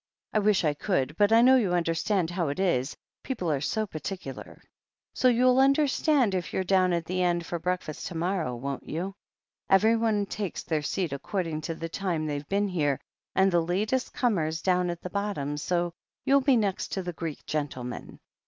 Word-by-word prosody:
I 215 - +3
wish 205 -2 +3
I 150 -2 +2
could, 145 -3 -1
but 205 +3 +3
I 230 +1 +7
know 260 +1 +7
you 195 -8 +1
understand 170 +1 0
how 175 -2 -1
it 140 +5 -3
is 155 -8 0
— - - -66
^people 180 - -1
are 135 - -4
so 215 +8 0
particular. 155 -5 -7 0.5
So 255 - +2
you'll 250 +1 +4
understand 275 - +3
if 180 -2 -2
you're 190 - 0
down 185 -1 +3
at 170 -1 0
the 185 +1 -1
end 175 -1 +1
for 170 - -3
breakfast 180 -3 -3
to 175 - -7
morrow, 170 -6 -1
won't 135 +3 -5
you? 180 +5 -3 0.6
Everyone 220 +1 +3
takes 200 -2 -4
their 155 -2 -1
seat 165 +1 -2
according 165 +1 -3
to 165 - -2
the 165 - -5
time 170 -2 -2
they've 145 -1 -4
been 200 +1 +1
here 145 -7 0 0.2
— - - -66
and 190 0 +4
the 175 -1 +3
latest 210 +10 -1
comers 165 - 0
down 180 -1 +2
at 175 0 -4
the 180 - -5
bottom, 200 -9 -2
so 175 +3 -1 0.3
you'll 275 +1 +5
be 265 -2 +4
next 200 -4 0
to 190 - -2
the 175 -1 -4
Greek 160 -2 -6
gentleman. 130 -5 -4
180 Hz, 195 wpm, -27 LUFS, 160-205 Hz, 0.6 s, I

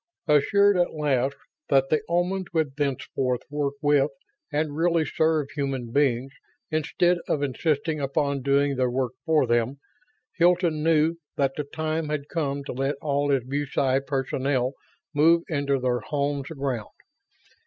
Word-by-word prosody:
Assured 200 +7 +4
at 175 -2 +1
last 140 -3 +1 0.3
that 135 -1 +3
the 155 - +3
Omans 180 +2 0
would 155 -5 0
thenceforth 130 -3 -1
work 145 -1 -1
with 145 -1 +4 0.4
and 150 0 -1
really 165 0 +2
serve 155 -3 +1
human 135 -5 -3
beings 135 -1 +1 0.4
instead 175 +3 +1
of 145 - 0
insisting 150 +2 0
upon 140 0 0
doing 140 +1 +2
their 130 -1 +2
work 125 -1 -1 0.2
for 155 -4 +4
them, 120 +3 +1 0.6
Hilton 170 -2 +3
knew 160 +1 +3 0.2
that 135 -2 +2
the 150 - -3
time 155 +1 -3
had 150 -1 -3
come 140 -4 -2
to - - -6
let 135 +3 -1
all 145 -1 0
his 135 -3 +2
BuSci 135 0 0
personnel 135 -1 0 0.4
move 165 +3 +4
into 140 -3 0
their 125 -1 0
homes 140 -1 -2
aground. 135 -8 -3
145 Hz, 145 wpm, -25 LUFS, 135-155 Hz, 0.6 s, Assured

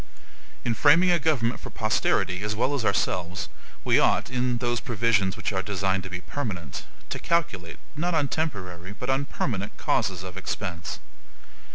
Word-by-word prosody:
In 120 - +2
framing 165 - +6
a 175 - +4
government 130 -6 +1
for - - -7
posterity 105 -4 +1
as 105 +1 -1
well 125 +6 +1
as 140 -5 0
ourselves, 90 -3 0 0.3
we - - +5
ought, - - +3
in 125 -1 +1
those 120 0 0
provisions 110 -5 +2
which - - -2
are 95 - +1
designed 95 -1 0
to 95 - -7
be 90 -1 -4
permanent, 90 - -4 0.3
to - - -2
calculate, 105 - 0 0.2
not 170 +3 0
on 150 -3 +3
temporary, 95 - -3
but 125 +5 -2
on 135 +1 +1
permanent 105 -8 -2
causes 90 -2 0
of 95 0 -7
expense. 90 -3 -3
110 Hz, 165 wpm, -27 LUFS, 95-135 Hz, 0.3 s, framing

